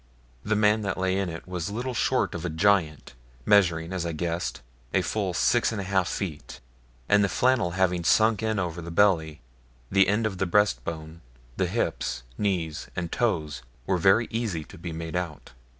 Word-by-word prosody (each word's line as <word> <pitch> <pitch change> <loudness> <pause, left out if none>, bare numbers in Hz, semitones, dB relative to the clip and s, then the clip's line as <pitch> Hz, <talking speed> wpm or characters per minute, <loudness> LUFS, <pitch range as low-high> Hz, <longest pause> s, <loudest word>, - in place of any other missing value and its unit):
The 110 - 0
man 105 +1 +3
that 100 -2 -2
lay 95 0 0
in 95 -2 -1
it 80 +1 -8
was 90 -2 -3
little 120 +5 -3
short 120 - +1
of 85 - -5
a 85 - -2
giant, 80 -4 +1 0.3
measuring, 85 -4 +3
as 90 -2 -2
I 85 -1 -3
guessed, 85 +2 -3 0.3
a 95 - +3
full 95 +2 -1
six 120 +4 +2
and 110 - -3
a - - -2
half 95 -1 +1
feet, 85 -8 -5 0.5
and 105 0 +4
the 100 - +1
flannel 120 -8 +2
having 90 -2 +1
sunk 110 +5 +3
in 110 -1 0
over 85 -2 -2
the 85 - -7
belly, 85 -5 +2 0.5
the 95 0 +5
end 105 +3 +1
of 95 -4 -3
the 95 - +1
breast 95 -10 +2
bone, 80 +1 -7 0.3
the - - 0
hips, - - -2
knees, 85 -7 -2
and 85 -1 -3
toes 80 - -1 0.2
were 95 -2 +1
very 95 +7 +4
easy 110 -9 -2
to - - -14
be 85 0 -6
made 80 +1 -5
out. 85 -5 -4
90 Hz, 190 wpm, -26 LUFS, 85-105 Hz, 0.5 s, the